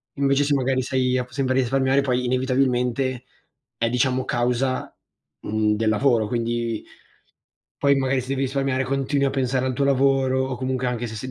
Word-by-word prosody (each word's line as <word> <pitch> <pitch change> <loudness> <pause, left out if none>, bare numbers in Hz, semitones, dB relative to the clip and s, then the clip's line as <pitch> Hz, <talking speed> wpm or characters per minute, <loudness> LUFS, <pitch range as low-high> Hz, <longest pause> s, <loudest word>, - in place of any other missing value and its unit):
Invece, 140 0 +2
se 145 - +1
magari 130 -1 +1
sei 130 0 0
a 125 - 0
p 125 - -17
sempre 130 -2 -1
risparmiare, 130 +1 +2
poi 125 -2 0
inevitabilmente 130 0 0 0.5
è, 115 - 0
diciamo, 130 +1 0
causa, 125 +2 -1 0.5
mhmm, 105 0 0
del 110 +1 -1
lavoro, 115 0 +2
quindi 115 -1 -2 1.0
poi 140 0 +3
magari 135 -1 +1
se 125 - -9
devi 135 0 -1
risparmiare, 135 0 0
continui 135 +1 0
a 135 - +1
pensare 130 -1 0
al 130 - 0
tuo 140 +2 0
lavoro 135 -1 +2
o 130 -2 -4
comunque, 130 0 -2
anche 120 -1 -2
se 110 - -7
sei 130 +4 -6
130 Hz, 175 wpm, -23 LUFS, 125-135 Hz, 1.0 s, poi